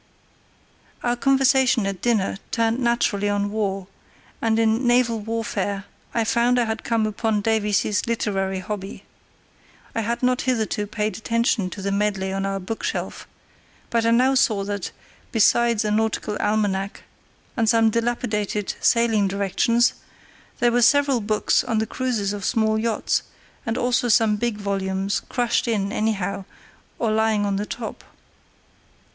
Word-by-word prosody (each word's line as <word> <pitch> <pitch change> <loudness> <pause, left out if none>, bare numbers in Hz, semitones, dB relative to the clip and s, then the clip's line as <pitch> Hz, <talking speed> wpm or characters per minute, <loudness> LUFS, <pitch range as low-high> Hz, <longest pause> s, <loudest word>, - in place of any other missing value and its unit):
Our 240 0 +1
conversation 265 -3 +3
at 195 -2 -3
dinner 215 -5 0
turned 230 +1 0
naturally 235 -4 +1
on 205 0 0
war, 195 -3 -2 0.6
and 225 -1 +2
in 225 +2 +2
naval 240 -2 +3
warfare 210 -2 -3 0.3
I 230 - +1
found 235 +2 +2
I - - +3
had 220 0 -3
come 225 -2 +1
upon 215 0 -1
Davies's 210 -1 +1
literary 195 -4 -1
hobby. 195 0 -6 0.9
I 225 - -1
had 235 +3 -2
not 250 0 +2
hitherto 220 -4 -1
paid 210 +1 -2
attention 230 -3 0
to 195 - -8
the 200 - -1
medley 195 -1 0
on 195 0 -1
our 195 0 -2
bookshelf, 205 +4 -4 0.6
but 230 -1 +2
I 230 - +3
now 250 +3 +4
saw 215 -6 +2
that, 205 -1 -3 0.4
besides 235 -1 +3
a 210 - 0
Nautical 215 -1 0
Almanack 205 -2 -1 0.5
and 225 -2 +2
some 225 -1 +4
dilapidated 215 -3 -1
Sailing 225 -4 +3
Directions, 200 +5 +2 0.7
there 240 -1 +3
were 245 +1 +2
several 275 +1 +4
books 215 +1 +1
on 240 -3 -1
the 220 - +1
cruises 225 -5 -2
of 205 -1 -6
small 220 -1 +1
yachts, 225 0 0 0.5
and 225 +1 -1
also 245 0 +1
some 220 -1 +4
big 235 -1 -1
volumes 195 -1 -1
crushed 240 -1 0
in 200 -4 0
anyhow 200 -3 -1 0.5
or 225 -2 0
lying 220 -1 +2
on 200 -1 0
the 205 +1 -3
top. 230 -2 -6
220 Hz, 145 wpm, -23 LUFS, 205-235 Hz, 0.9 s, now